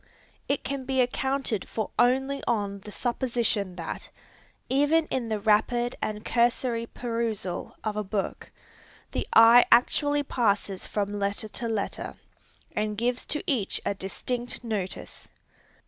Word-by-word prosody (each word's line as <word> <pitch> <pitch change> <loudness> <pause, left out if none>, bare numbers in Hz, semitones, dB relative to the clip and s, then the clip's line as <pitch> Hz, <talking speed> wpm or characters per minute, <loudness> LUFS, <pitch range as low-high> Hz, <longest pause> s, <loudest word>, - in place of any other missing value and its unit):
It 280 - 0
can 275 -1 -3
be 265 0 0
accounted 255 -3 0
for 220 -2 -3
only 265 +3 +2
on 200 -4 0
the 210 +2 -10
supposition 235 -6 0
that, 170 -2 -6 0.6
even 290 +4 +3
in 245 -3 -1
the 215 -1 0
rapid 225 +3 +2
and 215 0 -3
cursory 235 -1 +1
perusal 230 -7 -3
of 215 -1 -2
a 210 - -1
book, 195 0 -3 0.6
the - - -2
eye 230 +2 +9
actually 290 +4 +4
passes 205 -7 0
from 205 -1 -2
letter 200 +2 -1
to 235 - -5
letter, 220 -3 -3 0.6
and 210 0 -1
gives 245 +2 -1
to 300 - -1
each 235 -9 +1
a - - +1
distinct 240 +6 -4
notice. 210 -5 -4
230 Hz, 130 wpm, -27 LUFS, 210-250 Hz, 0.6 s, eye